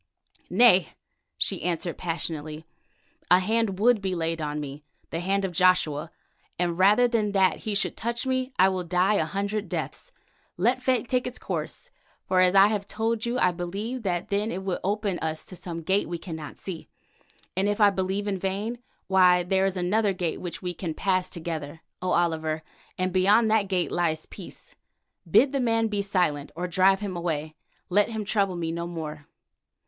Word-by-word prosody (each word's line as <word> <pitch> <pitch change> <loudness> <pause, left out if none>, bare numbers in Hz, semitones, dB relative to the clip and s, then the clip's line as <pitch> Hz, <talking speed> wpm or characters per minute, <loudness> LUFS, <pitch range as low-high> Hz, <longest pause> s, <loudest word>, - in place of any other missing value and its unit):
"Nay," 190 - +5 0.4
she - - -1
answered 170 0 -2
passionately. 160 -2 -4 0.6
"A 180 - +8
hand 210 +1 0
would 225 +1 +4
be 190 -2 -1
laid 165 -1 -2
on 150 0 -2
me, 145 0 -7 0.3
the 165 - -2
hand 195 +2 0
of 190 - -3
Joshua, 170 -3 +2 0.5
and 175 0 -1
rather 210 +6 +6
than 215 -4 0
that 190 -2 +3
he 210 - 0
should 200 - +1
touch 235 +3 -3
me 260 0 -1
I 190 - +6
will 185 -1 -1
die 180 +4 +2
a 180 -6 +2
hundred 200 +4 -2
deaths. - - -5 0.5
Let 240 +8 +2
fate 255 -2 +1
take 250 0 0
its 250 - -6
course, - - -5 0.4
for 185 -1 +2
as 185 +1 +4
I 195 0 +8
have 205 -2 -2
told 225 +2 -1
you, 240 +1 -1
I 180 -7 +3
believe 200 +8 -4
that 185 -1 -2
then 205 +2 0
it 190 - -4
will 190 -2 -2
open 200 -1 -1
to - - -7
us 160 -1 -2
some 170 -2 -7
gate 190 +3 +1
we 170 - -3
cannot 160 -3 -8
see. 175 -5 -7 0.7
And 195 +2 +1
if 205 - -1
I 205 -1 +6
believe 195 +2 -2
in 195 -2 -1
vain, 200 +6 -2 0.3
why 180 -2 +5
there 190 +2 +2
is 190 -1 -3
another 200 +3 +1
gate 175 -3 -3
which 180 +1 -6
we 180 0 -2
can 165 -2 -5
pass 185 -2 0
together, 160 -2 -5 0.2
O 185 - -1
Oliver, 160 -2 0 0.3
and 185 0 -1
beyond 205 +4 +4
that 215 -2 +3
gate 185 -2 0
lies 160 -3 0
peace. - - -11 0.6
Bid 270 - +5
the 275 - 0
man 225 -2 +1
be 205 -1 -1
silent, 180 -8 0
or 180 +2 -3
drive 190 +2 +3
him 200 -3 -4
away. 160 -3 -3 0.4
Let 205 +4 +3
him 220 -2 -4
trouble 195 -2 +1
me 165 -1 -2
no 170 +1 -3
more." 155 -3 -6
185 Hz, 185 wpm, -26 LUFS, 170-205 Hz, 0.7 s, A